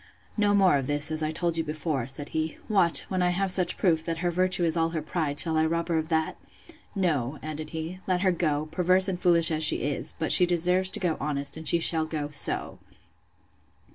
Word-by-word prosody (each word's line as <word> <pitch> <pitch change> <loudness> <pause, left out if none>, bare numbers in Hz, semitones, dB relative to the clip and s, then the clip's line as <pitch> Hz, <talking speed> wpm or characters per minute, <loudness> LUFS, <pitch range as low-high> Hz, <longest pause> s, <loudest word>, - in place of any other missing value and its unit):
No 205 -1 +1
more 190 -7 +4
of 130 - -5
this, 145 +1 -1
as 155 0 0
I 155 0 -1
told 170 +1 -3
you 165 - -1
before, 150 -4 -4
said 140 +2 -2
he: 160 0 -3
What! 190 -6 +2
when 185 -1 -2
I 180 - +2
have 190 +2 -1
such 180 -1 +2
proof, 165 -4 +1
that 165 -1 -3
her 175 - +1
virtue 185 +1 +1
is 165 -1 0
all 165 -1 0
her 165 -1 -4
pride, 155 -3 -3
shall 160 -2 +3
I 160 - +2
rob 170 +1 -3
her 165 -1 +1
of 160 +1 -6
that?—No, 160 - -4
added 155 0 -6
he, 165 +3 -6
let 180 -1 0
her 190 -1 +2
go, 155 -4 -1
perverse 185 +3 +3
and 180 -2 -4
foolish 170 -2 +5
as 155 0 0
she 150 - +2
is; 145 0 -3
but 160 - -2
she 180 - +5
deserves 180 +2 +2
to - - +5
go 175 -4 -1
honest, 140 -1 -1
and 160 0 -3
she 170 - +5
shall 160 -1 +2
go 150 -2 -5
so! 140 - -2
165 Hz, 225 wpm, -26 LUFS, 155-180 Hz, -, foolish